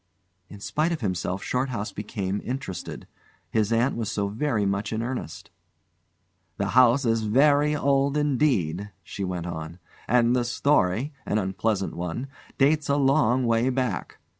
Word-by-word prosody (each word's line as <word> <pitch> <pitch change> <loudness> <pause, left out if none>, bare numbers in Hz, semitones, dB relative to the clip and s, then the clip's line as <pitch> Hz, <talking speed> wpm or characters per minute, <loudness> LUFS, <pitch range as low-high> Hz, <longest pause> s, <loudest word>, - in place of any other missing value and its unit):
In 105 - -11
spite 155 +10 0
of 165 - -3
himself 90 -2 -2
Shorthouse 125 -5 -2
became 100 -2 -3
interested. 125 -8 -5 0.5
His 110 0 +1
aunt 120 +4 +2
was 115 -3 -3
so 100 -1 -1
very 110 -1 0
much 100 +1 -1
in 110 +1 -2
earnest. 125 +1 -5 1.1
"The - - -1
house 130 +2 +5
is 115 -1 +2
very 145 +7 +3
old 140 0 +2
indeed," 125 - +1
she 100 - -6
went 90 -2 -3
on, 80 -1 -6 0.3
"and 120 0 +3
the 125 - +2
story 120 0 +1
an 105 - +1
unpleasant 95 0 -1
one 90 +10 -4 0.3
dates 145 +2 +2
a 140 - +3
long 135 -3 +3
way 115 +2 +2
back. 125 -7 -2
115 Hz, 145 wpm, -25 LUFS, 100-135 Hz, 1.1 s, house